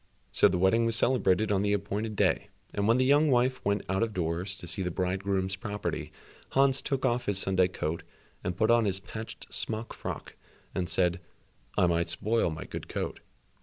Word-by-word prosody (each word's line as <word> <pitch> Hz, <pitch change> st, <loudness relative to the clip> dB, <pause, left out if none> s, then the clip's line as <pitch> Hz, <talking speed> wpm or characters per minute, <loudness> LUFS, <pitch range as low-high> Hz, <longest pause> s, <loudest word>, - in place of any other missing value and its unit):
So -, -, +5 dB
the 90 Hz, -, 0 dB
wedding 115 Hz, +6 st, +3 dB
was 115 Hz, -, +4 dB
celebrated 110 Hz, -4 st, +3 dB
on 100 Hz, -1 st, +2 dB
the 100 Hz, 0 st, +1 dB
appointed 105 Hz, +2 st, -2 dB
day, 100 Hz, 0 st, +2 dB, 0.3 s
and 100 Hz, 0 st, 0 dB
when 115 Hz, +2 st, +5 dB
the 130 Hz, -, +3 dB
young 145 Hz, +3 st, +5 dB
wife 130 Hz, 0 st, +2 dB
went 100 Hz, +1 st, 0 dB
out 95 Hz, +2 st, 0 dB
of 115 Hz, -2 st, -1 dB
doors 90 Hz, +3 st, -2 dB
to 90 Hz, -, -8 dB
see 90 Hz, +3 st, -1 dB
the 90 Hz, -, -1 dB
bridegroom's 95 Hz, +1 st, -1 dB
property, 105 Hz, +2 st, -4 dB, 0.4 s
Hans 135 Hz, 0 st, +4 dB
took 135 Hz, -2 st, -1 dB
off 120 Hz, +1 st, 0 dB
his 100 Hz, -2 st, +1 dB
Sunday 95 Hz, -1 st, +3 dB
coat 85 Hz, -2 st, -3 dB, 0.4 s
and 90 Hz, -1 st, -3 dB
put 110 Hz, +3 st, +3 dB
on 120 Hz, -1 st, +4 dB
his 95 Hz, -1 st, 0 dB
patched 110 Hz, +3 st, -9 dB
smock 110 Hz, +1 st, -2 dB
frock -, -, -6 dB, 0.4 s
and 90 Hz, -2 st, -2 dB
said, 90 Hz, -1 st, +1 dB, 0.6 s
"I 95 Hz, -, +5 dB
might 85 Hz, -1 st, +1 dB
spoil 110 Hz, +4 st, +1 dB
my 80 Hz, -, -5 dB
good -, -, -7 dB
coat." -, -, -4 dB
100 Hz, 195 wpm, -29 LUFS, 90-115 Hz, 0.6 s, So